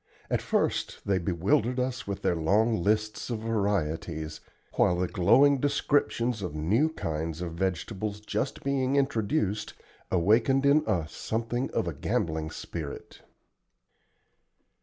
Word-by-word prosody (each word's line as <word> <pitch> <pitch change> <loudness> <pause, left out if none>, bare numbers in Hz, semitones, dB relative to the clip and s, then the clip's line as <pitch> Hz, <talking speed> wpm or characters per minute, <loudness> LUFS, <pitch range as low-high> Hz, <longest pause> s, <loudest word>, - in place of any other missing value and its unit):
At - - +1
first - - -1
they 95 -2 +2
bewildered 95 +8 +1
us 125 -2 -2
with 100 -1 -4
their 85 - +2
long 105 +7 +2
lists 105 +4 0
of 115 -3 -3
varieties, 85 -8 -2 0.3
while 90 - +3
the 90 0 0
glowing 135 +11 +4
descriptions 125 -5 +1
of 90 -5 -4
new 105 - +2
kinds 80 - -4
of 90 -1 -4
vegetables 95 +4 -2
just 105 +5 -3
being 135 -1 +1
introduced 110 -5 0 0.3
awakened 115 +9 +3
in 145 +2 +5
us 85 -4 -1
something 115 +3 -2
of - - -1
a - - -2
gambling 80 -1 -1
spirit. 80 -2 -7
105 Hz, 125 wpm, -28 LUFS, 85-125 Hz, 0.3 s, in